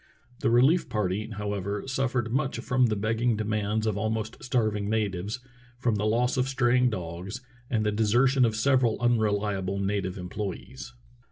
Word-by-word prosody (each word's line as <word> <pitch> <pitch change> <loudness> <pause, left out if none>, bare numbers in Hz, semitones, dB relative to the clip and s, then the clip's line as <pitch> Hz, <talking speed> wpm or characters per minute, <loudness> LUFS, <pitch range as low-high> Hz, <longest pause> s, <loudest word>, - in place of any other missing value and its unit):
The - - +1
relief 135 +9 +4
party, 105 0 -1
however, 105 -1 -3
suffered 130 -3 -1
much 135 0 0
from 125 -1 +2
the 110 - 0
begging 110 +2 0
demands 110 0 -1
of 105 -2 0
almost 110 +1 -3
starving 110 -5 0
natives, 105 0 -1 0.4
from 120 -2 +1
the 105 0 0
loss 120 +4 +1
of 130 0 +2
straying 125 -1 +3
dogs, 90 +3 -5 0.3
and 110 -3 0
the 105 - +2
deser 110 +5 +3
tion 130 0 +3
of 115 -2 +2
several 125 -1 +2
unreliable 105 -5 +1
native 100 -1 -1
employees. 105 +7 -6
110 Hz, 155 wpm, -27 LUFS, 105-125 Hz, 0.4 s, relief